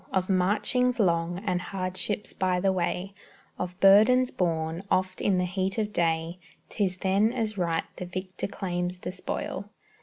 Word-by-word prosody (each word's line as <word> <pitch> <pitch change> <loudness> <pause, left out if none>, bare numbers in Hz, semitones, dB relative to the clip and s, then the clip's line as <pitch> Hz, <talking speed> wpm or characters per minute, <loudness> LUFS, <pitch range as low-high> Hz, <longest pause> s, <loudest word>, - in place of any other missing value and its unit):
Of 190 0 0
marchings 225 +7 +2
long, 175 -1 +1
and 180 -3 0
hardships 185 +2 -3
by 185 -2 +1
the 195 +1 +2
way, 185 +2 -2 0.5
Of 180 0 -4
burdens 220 +6 +6
borne, 165 -1 -1
oft 185 0 0
in 195 -2 +2
the 180 - +1
heat 190 +2 -2
of 210 -1 -1
day, 165 +1 0 0.3
'Tis 190 -3 -1
then 195 +4 +2
as 225 -4 -2
right 170 -3 0
the 180 - -5
victor 185 +1 -4
claims 180 -2 -3
the 180 - -5
spoil. 185 - -4
185 Hz, 155 wpm, -27 LUFS, 180-200 Hz, 0.5 s, burdens